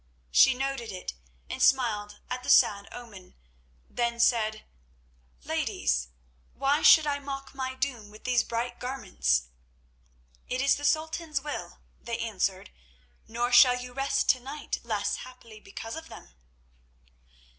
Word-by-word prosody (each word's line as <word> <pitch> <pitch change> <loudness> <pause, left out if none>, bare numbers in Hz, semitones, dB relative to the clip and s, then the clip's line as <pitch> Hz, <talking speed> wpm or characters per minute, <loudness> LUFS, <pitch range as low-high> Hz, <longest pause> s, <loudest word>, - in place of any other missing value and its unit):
She 265 - +6
noted 270 -3 -3
it 185 - -6 0.3
and - - -5
smiled 215 -6 +2
at 250 0 -4
the - - -7
sad 200 -1 +4
omen, 210 -7 -11 0.5
then 235 -1 -2
said: 220 -3 +2 0.8
"Ladies, - - -1 0.5
why 275 +2 +1
should 315 -2 +8
I 285 -1 -1
mock 275 -1 -7
my 260 -1 -4
doom 255 -6 -3
with 215 +1 -15
these 250 -1 +2
bright 240 +1 -3
garments?" 65 - 0 1.0
"It 255 - -2
is 275 +1 +4
the 290 - -5
Sultan's 315 0 0
will," 295 +1 -6 0.2
they 235 -1 -4
answered; 200 -5 -2 0.6
"nor 240 +2 -1
shall 250 0 +7
you 250 0 -8
rest 275 +1 0
to 255 - +5
night 275 +4 -5
less 215 -3 -1
happily 240 -4 -12
because 225 +2 -8
of 320 0 -9
them." - - -13
245 Hz, 135 wpm, -28 LUFS, 215-270 Hz, 1.0 s, should